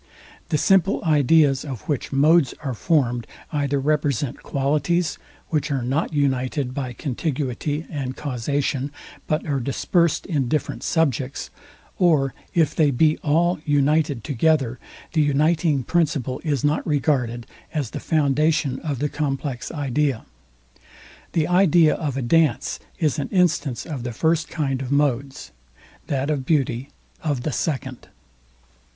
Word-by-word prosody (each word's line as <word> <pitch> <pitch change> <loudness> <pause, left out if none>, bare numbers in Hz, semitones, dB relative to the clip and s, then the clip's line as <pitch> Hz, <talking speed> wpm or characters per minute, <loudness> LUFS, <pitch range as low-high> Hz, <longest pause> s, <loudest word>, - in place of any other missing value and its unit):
The 150 - +2
simple 195 +4 +3
ideas 145 -2 +4
of 130 -8 -6
which 145 +2 -3
modes 145 0 +4
are 135 -3 -2
formed, 120 -3 +1 0.2
either 145 -2 0
represent 140 -2 0
qualities, 150 +4 0 0.3
which 155 -3 0
are 135 -4 -1
not 135 +8 -1
united 135 -2 0
by 130 -2 -4
contiguity 145 +2 -3
and 135 -4 -4
causation, 140 +1 -2 0.4
but 155 +1 0
are 145 -4 0
dispersed 165 +6 +1
in 145 -8 0
different 150 +4 -2
subjects; 140 -5 -1 0.5
or 150 -7 +3 0.2
if 165 -3 +2
they 155 -3 +4
be 155 +4 +3
all 170 +3 +2
united 145 -3 +2
together, 135 -2 +1 0.3
the 160 - +3
uniting 150 0 +2
principle 145 -5 0
is 145 -6 -1
not 150 +1 +1
regarded 130 -6 0 0.3
as 145 -7 -2
the - - -5
foundation 150 -2 +1
of 145 -4 -3
the 145 +4 0
complex 140 -3 -3
idea. 145 -4 -1 1.1
The 160 -2 +1
idea 175 -3 +5
of 145 -5 -3
a 135 - -1
dance 155 +2 +2 0.2
is 155 -5 0
an 140 - -3
instance 160 - +1
of 145 -6 -5
the 120 0 -4
first 160 +5 +1
kind 135 -5 -2
of 130 0 -5
modes; 140 -2 0 0.6
that 140 +1 -1
of 140 -3 -1
beauty 135 -3 0 0.3
of 145 -6 -1
the 155 - -1
second. 130 -4 -3
145 Hz, 135 wpm, -23 LUFS, 130-155 Hz, 1.1 s, idea